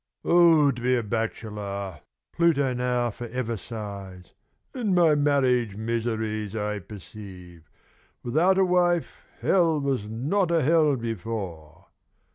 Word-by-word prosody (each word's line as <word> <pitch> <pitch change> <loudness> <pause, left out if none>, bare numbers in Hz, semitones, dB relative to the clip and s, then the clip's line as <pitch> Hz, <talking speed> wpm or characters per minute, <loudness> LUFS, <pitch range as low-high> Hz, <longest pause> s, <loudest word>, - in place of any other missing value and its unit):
"O 165 -4 +5
to 120 - -7
be 125 +1 +2
a 120 - 0
bachelor!" 105 -4 -4 0.3
Pluto 145 -6 +2
now 125 -1 0
forever 120 +1 -4
sighs. 100 -5 -8 0.4
"In 220 -8 0
my 170 -3 +5
marriage 130 -7 +2
miseries, 110 -2 -2
I 105 -1 -2
perceive, 90 -4 -12 0.5
without 165 +10 +2
a 190 - +4
wife 175 -2 +2 0.3
Hell 165 -5 +3
was 135 -7 -1
not 150 - 0
a 170 -3 +2
hell 155 0 +4
before. 95 -8 -6
120 Hz, 115 wpm, -25 LUFS, 105-150 Hz, 0.5 s, O